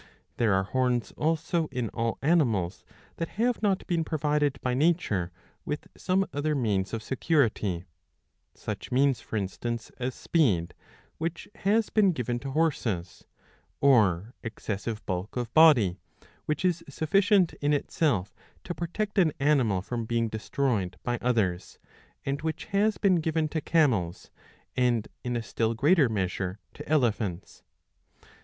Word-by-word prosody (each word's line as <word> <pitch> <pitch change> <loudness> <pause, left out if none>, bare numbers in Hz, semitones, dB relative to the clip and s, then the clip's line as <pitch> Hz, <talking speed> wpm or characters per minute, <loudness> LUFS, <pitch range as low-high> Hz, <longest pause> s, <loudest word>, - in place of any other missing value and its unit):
There 110 -5 +3
are 95 - +2
horns 125 +2 0
also 160 +1 0
in 125 -5 -3
all 115 -1 -2
animals 120 - +2 0.3
that 165 - -2
have 240 0 +1
not 200 -3 +1
been 170 -2 0
provided 150 -2 0
by 125 - 0
nature 130 - +1 0.3
with 150 - -4
some 190 +1 +1
other 150 +1 0
means 105 -7 0
of 115 -1 -4
security; 115 - 0 0.7
such - - -6
means 135 0 +3
for 110 - -4
instance 115 +4 -4
as 125 +1 -2
speed, 105 - +1 0.5
which 165 +1 -3
has 210 +3 +1
been 200 -4 +4
given 120 -4 -2
to 135 +2 -6
horses; 120 - -1 0.5
or 110 -6 +3
excessive 110 -1 -5
bulk 95 +5 -3
of 120 -2 -3
body, 130 - +6 0.5
which 155 +4 -1
is 170 -2 +1
sufficient 195 +3 +3
in 145 +1 +2
itself 130 - 0 0.3
to 175 - -4
protect 200 +5 -2
an 160 -5 +4
animal 130 -10 +2
from 115 +1 -3
being 115 0 0
destroyed 110 -4 -1
by 120 -1 -1
others 105 -8 0 0.5
and 140 +1 -2
which 160 0 -3
has 210 +2 +3
been 190 -4 +3
given 160 -1 0
to 160 +1 -2
camels, 115 - +1 0.4
and 120 -4 +1
in 125 0 -2
a 115 - -2
still 115 +1 -1
greater 145 +2 +4
measure 95 -2 -2 0.2
to - - -10
elephants. 110 - 0
130 Hz, 140 wpm, -28 LUFS, 110-160 Hz, 0.7 s, body